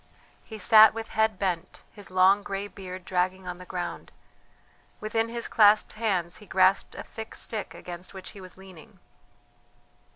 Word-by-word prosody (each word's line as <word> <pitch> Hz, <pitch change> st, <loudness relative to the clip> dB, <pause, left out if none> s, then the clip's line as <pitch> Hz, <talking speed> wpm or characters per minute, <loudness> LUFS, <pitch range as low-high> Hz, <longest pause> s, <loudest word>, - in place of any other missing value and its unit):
He 220 Hz, -, -9 dB
sat 220 Hz, 0 st, +7 dB
with 225 Hz, 0 st, -6 dB
head 220 Hz, -2 st, +1 dB
bent, 180 Hz, -2 st, -3 dB
his 205 Hz, -3 st, -9 dB
long 185 Hz, +2 st, +4 dB
grey 200 Hz, 0 st, -4 dB
beard 185 Hz, -3 st, -9 dB
dragging 185 Hz, +1 st, -1 dB
on 180 Hz, 0 st, -6 dB
the 180 Hz, -, -11 dB
ground; 180 Hz, -1 st, -5 dB, 0.9 s
within 225 Hz, +2 st, -1 dB
his 235 Hz, 0 st, -4 dB
clasped 210 Hz, -1 st, +4 dB
hands 190 Hz, -6 st, -1 dB
he 210 Hz, -, -14 dB
grasped 190 Hz, +1 st, +2 dB
a -, -, -6 dB
thick 220 Hz, 0 st, -9 dB
stick 220 Hz, -2 st, -3 dB
against 175 Hz, 0 st, -9 dB
which 190 Hz, -1 st, -9 dB
he 200 Hz, -, -12 dB
was 185 Hz, 0 st, -12 dB
leaning. 190 Hz, -4 st, -15 dB
195 Hz, 160 wpm, -27 LUFS, 185-215 Hz, 0.9 s, sat